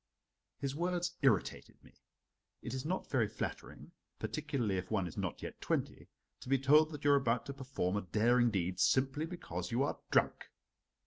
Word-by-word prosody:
His 140 -1 -3
words 175 +1 -1
irritated 130 -9 0
me. - - -18 0.7
It 115 - -5
is 130 +1 -4
not 185 +3 -3
very 120 -5 +3
flattering, - - -6 0.3
particularly 135 -10 -2
if 90 - -7
one 105 -4 0
is 85 - -7
not - - -4
yet - - -7
twenty, - - -2 0.3
to - - -10
be 135 - +4
told 150 +4 +5
that 150 -2 -8
you 145 - +6
are - - +7
about 125 -3 +1
to 140 - -5
perform 130 -9 -2
a 105 - 0
daring 120 +6 +3
deed 90 -3 -1
simply 135 - +2
because 90 - -5
you 120 +3 +1
are 145 - -2
drunk. - - +2
130 Hz, 180 wpm, -34 LUFS, 105-145 Hz, 0.7 s, are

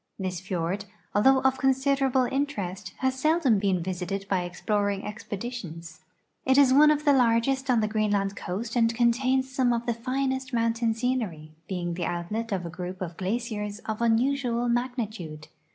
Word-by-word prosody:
This 185 -3 -3
fiord, 185 +1 -2 0.3
although 265 +5 +5
of 265 0 +2
consider 270 +1 +2
able 260 0 +2
interest, 210 -9 -3
has 260 0 0
seldom 305 -7 +3
been 190 -3 +1
visited 185 +2 -3
by 180 -2 0
exi)loring 205 +1 -1
expeditions. 195 -6 -6 0.4
It 265 +1 +3
is 275 -2 +6
one 300 +2 +7
of 300 0 +1
the 290 - +6
largest 260 +2 +2
on 240 -3 +4
the 215 - +1
Greenland 205 -2 0
coast 215 +7 -4
and 230 -1 +3
contains 260 +3 +2
some 255 -2 +3
of 235 0 -1
the 240 - +1
finest 265 +2 -2
mountain 230 -1 +1
scenery, 220 -11 -2 0.2
being 175 -2 -3
the 175 0 -3
outlet 210 +7 -3
of 185 -3 -1
a - - -4
group 180 +2 -6
of 175 -2 -5
glaciers 210 +1 -3
of 220 +1 -3
unusual 240 +1 +1
magnitude. 225 -11 -3
230 Hz, 165 wpm, -27 LUFS, 190-260 Hz, 0.4 s, one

